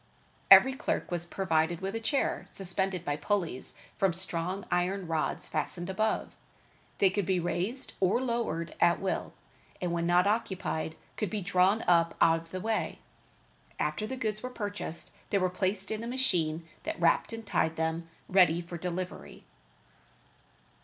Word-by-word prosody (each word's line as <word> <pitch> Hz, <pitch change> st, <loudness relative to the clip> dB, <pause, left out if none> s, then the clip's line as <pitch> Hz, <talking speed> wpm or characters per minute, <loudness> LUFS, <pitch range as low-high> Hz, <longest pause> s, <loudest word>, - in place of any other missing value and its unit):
Every 265 Hz, -, +9 dB
clerk 265 Hz, -, -2 dB
was 175 Hz, -1 st, -3 dB
provided 170 Hz, -3 st, +1 dB
with 195 Hz, +1 st, -3 dB
a 225 Hz, -, -2 dB
chair 275 Hz, +5 st, 0 dB
suspended 190 Hz, -1 st, -2 dB
by 145 Hz, 0 st, -1 dB
pulleys 170 Hz, -5 st, -1 dB, 0.2 s
from 195 Hz, -3 st, +3 dB
strong 185 Hz, +2 st, -2 dB
iron 180 Hz, +2 st, +1 dB
rods 160 Hz, -2 st, -1 dB
fastened 175 Hz, +1 st, -2 dB
above. 215 Hz, +3 st, 0 dB, 0.7 s
They 195 Hz, -2 st, +4 dB
could 200 Hz, -2 st, -1 dB
be 190 Hz, -2 st, +2 dB
raised 180 Hz, +9 st, -1 dB
or 190 Hz, +4 st, +3 dB
lowered 235 Hz, -10 st, -2 dB
at 175 Hz, 0 st, +5 dB
will; 195 Hz, -, -2 dB, 0.5 s
and 180 Hz, -2 st, -1 dB
when 170 Hz, 0 st, 0 dB
not 175 Hz, +1 st, +4 dB
occupied, 190 Hz, -7 st, -1 dB, 0.2 s
could 210 Hz, -, -1 dB
be 210 Hz, -2 st, -2 dB
drawn 190 Hz, +3 st, +3 dB
up 170 Hz, -1 st, +3 dB
out 165 Hz, 0 st, +5 dB
of 165 Hz, -, -17 dB
the 185 Hz, -, -4 dB
way. 220 Hz, +3 st, -1 dB, 0.8 s
After 215 Hz, -, -1 dB
the 260 Hz, -, -4 dB
goods 215 Hz, -4 st, -2 dB
were 255 Hz, -, -4 dB
purchased, 205 Hz, -8 st, -4 dB, 0.2 s
they 200 Hz, -, +2 dB
were 185 Hz, -2 st, +1 dB
placed 190 Hz, +2 st, -1 dB
in 220 Hz, +1 st, -3 dB
a -, -, -4 dB
machine 170 Hz, -11 st, 0 dB
that -, -, -4 dB
wrapped 170 Hz, +5 st, +3 dB
and 225 Hz, -1 st, -6 dB
tied 160 Hz, -5 st, +1 dB
them 160 Hz, +1 st, -2 dB, 0.2 s
ready 180 Hz, -3 st, +5 dB
for 170 Hz, 0 st, -7 dB
delivery. 180 Hz, -, -5 dB
185 Hz, 160 wpm, -30 LUFS, 170-205 Hz, 0.8 s, Every